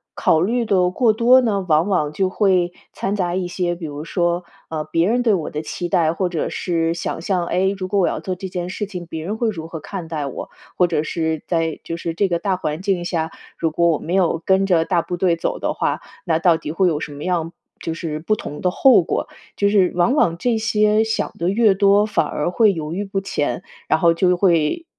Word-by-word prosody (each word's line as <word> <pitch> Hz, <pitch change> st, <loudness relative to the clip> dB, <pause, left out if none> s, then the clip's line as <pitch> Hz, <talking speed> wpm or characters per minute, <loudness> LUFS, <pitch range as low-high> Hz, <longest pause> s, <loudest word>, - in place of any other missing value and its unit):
考 160 Hz, -, +3 dB
虑 235 Hz, +7 st, +1 dB
的 185 Hz, -5 st, +2 dB
过 230 Hz, +3 st, +3 dB
多 240 Hz, +4 st, +5 dB
呢， 200 Hz, -6 st, 0 dB
往 160 Hz, +3 st, +3 dB
往 155 Hz, -6 st, 0 dB
就 190 Hz, +3 st, 0 dB
会 185 Hz, -3 st, +2 dB, 0.2 s
掺 195 Hz, +2 st, -2 dB
杂 180 Hz, -3 st, -1 dB
一 185 Hz, -1 st, -1 dB
些 175 Hz, 0 st, -1 dB
比 175 Hz, 0 st, -10 dB
如 145 Hz, +1 st, -7 dB
说， 175 Hz, 0 st, 0 dB, 0.3 s
呃， 155 Hz, -1 st, -3 dB
别 165 Hz, +3 st, +1 dB
人 245 Hz, +2 st, +1 dB
对 225 Hz, -3 st, +3 dB
我 170 Hz, -6 st, -1 dB
的 150 Hz, +1 st, -5 dB
期 175 Hz, +2 st, -4 dB
待， 165 Hz, -4 st, +2 dB
或 180 Hz, +1 st, -1 dB
者 170 Hz, -3 st, -2 dB
是 165 Hz, -2 st, -1 dB
想 170 Hz, -, -4 dB
象。 175 Hz, 0 st, -1 dB
哎， 190 Hz, +2 st, +1 dB
如 185 Hz, -1 st, -4 dB
果 200 Hz, +1 st, 0 dB
我 175 Hz, -, +3 dB
要 -, -, -2 dB
做 185 Hz, -, -4 dB
这 190 Hz, +2 st, -6 dB
件 180 Hz, -1 st, -4 dB
事 210 Hz, +3 st, -3 dB
情， 180 Hz, -4 st, -8 dB
别 160 Hz, -1 st, -6 dB
人 210 Hz, +4 st, -3 dB
会 230 Hz, -1 st, +1 dB
如 160 Hz, -5 st, -5 dB
何 165 Hz, 0 st, -7 dB
看 175 Hz, +2 st, -7 dB
待 155 Hz, -3 st, -3 dB
我？ 135 Hz, -, -7 dB, 0.3 s
或 180 Hz, -, +5 dB
者 170 Hz, -, 0 dB
是 160 Hz, 0 st, -2 dB
在 165 Hz, -2 st, -1 dB
就 165 Hz, -, -5 dB
是 170 Hz, -1 st, -4 dB
这 195 Hz, +4 st, +1 dB
个 170 Hz, -2 st, 0 dB
大 195 Hz, +1 st, -1 dB
环 155 Hz, 0 st, -4 dB
境 190 Hz, -3 st, 0 dB
下， 165 Hz, -2 st, -2 dB, 0.3 s
如 165 Hz, -1 st, 0 dB
果 170 Hz, +2 st, +2 dB
我 160 Hz, -, +2 dB
没 170 Hz, -, -5 dB
有 180 Hz, -3 st, +2 dB
跟 190 Hz, 0 st, +3 dB
着 170 Hz, -4 st, +3 dB
大 175 Hz, -2 st, +1 dB
部 175 Hz, +1 st, -5 dB
队 175 Hz, -1 st, +2 dB
走 165 Hz, -, -2 dB
的 -, -, -2 dB
话， -, -, -1 dB, 0.3 s
那 165 Hz, -3 st, +2 dB
到 165 Hz, 0 st, +3 dB
底 150 Hz, -, -6 dB
会 180 Hz, +3 st, +2 dB
有 155 Hz, -3 st, 0 dB
什 150 Hz, -, -6 dB
么 145 Hz, +1 st, -8 dB
样 170 Hz, -3 st, -1 dB, 0.3 s
就 165 Hz, -, -4 dB
是 160 Hz, -3 st, -4 dB
不 195 Hz, +7 st, 0 dB
同 150 Hz, -7 st, -7 dB
的 180 Hz, -, +2 dB
后 250 Hz, +4 st, +5 dB
果？ 165 Hz, -, -2 dB, 0.3 s
就 200 Hz, -, +2 dB
是 200 Hz, -3 st, +3 dB
往 180 Hz, +8 st, +3 dB
往 170 Hz, -, +2 dB
这 230 Hz, +2 st, 0 dB
些 215 Hz, -1 st, +2 dB
想 220 Hz, 0 st, -2 dB
的 170 Hz, +2 st, +1 dB
越 215 Hz, 0 st, +4 dB
多， 200 Hz, +1 st, +4 dB
反 215 Hz, -, +1 dB
而 150 Hz, +4 st, -2 dB
会 215 Hz, +2 st, +4 dB
犹 160 Hz, -3 st, -4 dB
豫 200 Hz, -, -2 dB
不 195 Hz, -1 st, -2 dB
前， 145 Hz, -10 st, -2 dB, 0.2 s
然 160 Hz, -, +2 dB
后 170 Hz, -1 st, +4 dB
就 180 Hz, +1 st, +2 dB
会 175 Hz, -, +2 dB
180 Hz, 260 characters per minute, -20 LUFS, 165-195 Hz, 0.3 s, 多